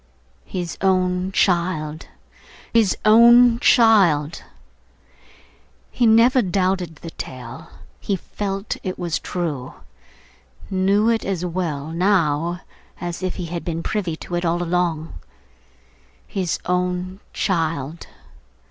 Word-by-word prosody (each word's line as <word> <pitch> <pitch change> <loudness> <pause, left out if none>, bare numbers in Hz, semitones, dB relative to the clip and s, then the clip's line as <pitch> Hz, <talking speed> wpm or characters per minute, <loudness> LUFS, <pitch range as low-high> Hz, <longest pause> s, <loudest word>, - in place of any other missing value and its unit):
His 175 -2 -5
own 185 -1 +1
child, 170 -5 0 0.7
his 225 -4 +3
own 235 +2 +7
child! 190 - +4 1.5
He 240 - +2
never 235 +4 +5
doubted 185 -3 -1
the 165 +2 -10
tale; 125 -3 -8 0.3
he 200 - -1
felt 195 +2 -4
it 185 -1 -4
was 170 -2 -2
true; 150 -8 -4 1.0
knew 195 +3 +2
it 225 -1 +1
as 185 -3 -2
well, 160 -4 -3
now, 170 -2 +1 0.4
as 175 -1 -5
if 185 -1 -2
he 180 - -5
had 170 0 -5
been 165 -1 -4
privy 185 -7 -2
to 175 - -10
it 175 0 -1
all 175 +1 0
along. 170 -2 -1 1.1
His 185 -4 -2
own 180 +1 -2
child! 165 -4 -2
180 Hz, 110 wpm, -21 LUFS, 165-195 Hz, 1.5 s, own